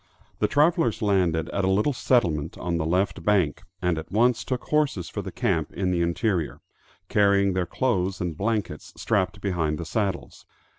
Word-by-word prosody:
The - - +2
travelers 150 -6 +2
landed 90 -6 +1
at 100 - -2
a 95 - +2
little 105 +9 +2
settlement 85 - +1
on 85 -1 -2
the 80 -1 -1
left 95 +1 0
bank, 95 -6 +2 0.2
and 90 -3 +1
at 80 - -10
once 120 +3 +2
took 130 -2 -3
horses 145 - 0
for - - -4
the - - -7
camp - - -1
in 95 -2 -1
the 85 -1 +1
interior, 85 - -1 0.5
carrying 100 -1 +3
their 90 -1 -1
clothes 95 -7 0
and 85 -3 -3
blankets 100 -5 -3
strapped 100 -2 0
behind 80 -6 -1
the 85 - -5
saddles. 95 +1 -3
95 Hz, 175 wpm, -25 LUFS, 85-105 Hz, 0.5 s, carrying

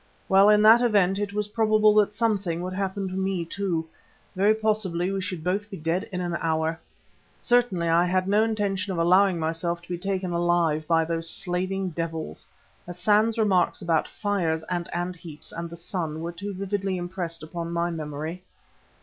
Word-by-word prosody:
Well, 195 +2 +6
in 210 0 +5
that 225 +2 +8
event, 200 -5 +3
it 205 -1 -2
was 210 0 -2
probable 215 -1 +4
that 210 -1 +4
something 200 -6 -1
would 185 +1 -4
happen 195 0 -2
to 185 - -6
me 190 -2 -1
too. 170 -3 -2 0.5
Very 205 +3 +4
possibly 205 -5 0
we 195 -1 -2
should 185 -4 -5
both 200 +4 -1
be 195 - -7
dead 165 +3 -2
in 180 -1 -3
an 175 -1 -2
hour. 160 0 0 0.6
Certainly 240 -9 +2
I 165 +1 +4
had 185 +1 +1
no 205 +2 +4
intention 205 -3 -1
of 180 - -3
allowing 185 +2 +4
myself 165 +2 -2
to 175 - -18
be 175 -1 -3
taken 190 -1 -2
alive 170 -3 +1
by 165 -1 +3
those 165 0 -2
slaving 185 +2 -2
devils. 165 - -5 0.4
Hassan's 210 +5 +2
remarks 195 -5 +2
about 165 -3 +1
fires 175 -6 -1
and 175 0 -2
ant 175 +1 -3
heaps 165 -3 -8
and 170 0 -5
the 170 - -9
sun 165 -3 -4
were 170 +1 -4
too 200 +4 -6
vividly 195 0 -2
impressed 175 -2 -4
upon 170 +1 -5
my 170 0 0
memory. 155 +2 -5
180 Hz, 180 wpm, -25 LUFS, 170-200 Hz, 0.6 s, that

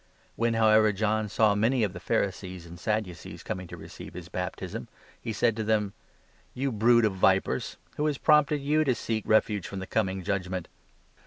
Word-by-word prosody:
When, 115 0 +1
however, 110 -1 +5
John 110 +1 0
saw 105 0 +3
many 115 +4 +2
of 100 -3 0
the 90 - -7
Pharisees 95 -1 -2
and 85 0 -11
7 110 +2 0
Sadducees 90 -3 -10
coming 90 0 -5
to - - -9
receive - - -10
his 90 -2 -8
baptism, 90 0 -5 0.3
he 115 - -4
said 110 +1 +1
to 110 - -1
them: 105 -2 +1 0.6
"You 135 +1 -1
brood 115 +1 +4
of 105 - +1
vipers! 95 0 +1 0.2
Who 150 - +1
has 150 -2 0
prompted 150 -1 +4
you 150 +3 +2
to 130 -5 +1
seek 110 -2 -2
refuge 105 -3 +2
from 100 - -7
the 95 - -4
coming 95 -2 -1
judgement? 95 -2 -2
105 Hz, 185 wpm, -28 LUFS, 95-115 Hz, 0.6 s, however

